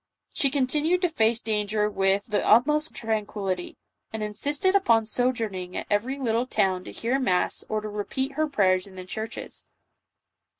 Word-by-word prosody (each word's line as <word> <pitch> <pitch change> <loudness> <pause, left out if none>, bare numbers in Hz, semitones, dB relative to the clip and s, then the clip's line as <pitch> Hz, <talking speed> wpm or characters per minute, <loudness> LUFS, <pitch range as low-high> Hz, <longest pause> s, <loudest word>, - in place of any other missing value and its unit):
She 275 - +2
continued 300 +7 +1
to 360 - +3
face 230 -6 +2
danger 210 -1 0
with 195 0 +1
the 210 -2 0
utmost 300 +7 +3
tranquillity, 210 -6 -3 0.3
and 220 -1 -4
insisted 290 - 0
upon 230 - +4
sojourning 220 -7 -2
at - - -3
every 235 +7 0
little 240 -2 0
town 185 -6 +1
to - - -7
hear 245 +4 -1
mass 185 -9 0
or 215 0 -1
to 215 - -5
repeat 215 +6 -3
her 310 +3 0
prayers 185 -7 +2
in 190 - -14
the 185 0 -8
churches. 220 +4 -7
220 Hz, 160 wpm, -26 LUFS, 205-265 Hz, 0.3 s, upon